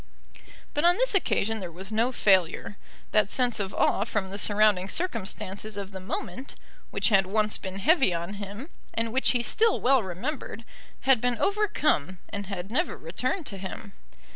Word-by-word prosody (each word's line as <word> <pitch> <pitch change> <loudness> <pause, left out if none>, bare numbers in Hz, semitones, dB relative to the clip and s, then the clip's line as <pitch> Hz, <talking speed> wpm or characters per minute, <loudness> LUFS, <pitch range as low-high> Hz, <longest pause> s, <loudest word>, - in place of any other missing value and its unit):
But 295 - 0
on 350 +1 +6
this - - +2
occasion 225 - +1
there 180 -4 -6
was 190 +5 -7
no 230 +4 +2
failure. 190 -4 +2 0.4
That 210 -2 +3
sense 245 -2 +1
of 195 -2 -2
awe 200 - +2
from 210 -3 -2
the 200 - -4
surrounding 205 -3 +3
circumstances 210 - -3
of 200 -1 -5
the 190 - -7
moment, 250 +7 -5 0.3
which - - +1
had 195 -3 +4
once 215 +2 +1
been 190 -1 -6
heavy 270 - +4
on 170 +3 -3
him, 205 - -7 0.3
and 230 0 -1
which 265 - +3
he 245 -2 +2
still 440 - +2
well 260 0 +4
remembered, 230 - -5 0.4
had 265 -3 +4
been 245 -1 +1
overcome, 310 - +1
and 200 -2 -5
had 195 0 -5
never 250 - 0
returned 255 - -3
to 195 -5 -6
him. 195 +2 -7
215 Hz, 170 wpm, -27 LUFS, 190-255 Hz, 0.4 s, on